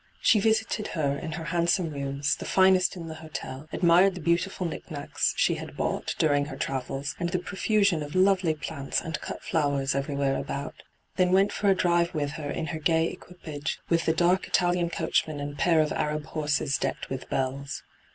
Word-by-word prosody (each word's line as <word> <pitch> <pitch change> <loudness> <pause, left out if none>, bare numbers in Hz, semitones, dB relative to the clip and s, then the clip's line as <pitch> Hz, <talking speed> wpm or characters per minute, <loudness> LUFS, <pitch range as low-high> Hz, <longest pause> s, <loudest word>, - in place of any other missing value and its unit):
She 215 - +4
visited 220 0 +1
her 140 -3 +1
in 160 +3 -5
her 165 0 -5
handsome 170 0 +1
rooms, 140 0 -1
the - - -8
finest 185 -1 +4
in 170 -2 -7
the 160 - -6
hotel, 150 -2 -7
admired 180 +2 +4
the - - -6
.beautifiil 175 +2 0
knick 160 - -7
knacks 145 -2 -1
she - - +3
had - - -9
bought - - -2
during 145 -2 +2
her 140 -2 -7
travels, 135 +1 -3
and 175 -1 -1
the 180 - 0
profusion 200 -1 +1
of 145 +2 -6
lovely 185 -3 +3
plants 140 -2 -3
and 160 -1 -5
cut - - -6
flowers 140 -3 0
everywhere 140 0 0
about; 140 +1 -5 0.4
then 180 -1 +3
went 195 +2 +4
for 205 - +1
a 195 - +5
drive 175 -2 +2
with 145 -2 -1
her 150 -1 -5
in 160 - -2
her 160 - -3
gay 160 +1 +2
equipage 160 -4 -6
with 165 -1 +1
the - - +5
dark 175 +3 +2
Italian 175 -1 +2
coachman 160 -2 0
and 145 0 -5
pair 170 -3 +4
of 155 - 0
Ajab 150 0 -1
horses 150 -3 0
decked 135 - -3
with 130 -1 -5
bells. 135 +1 -2
160 Hz, 190 wpm, -27 LUFS, 145-180 Hz, 0.4 s, a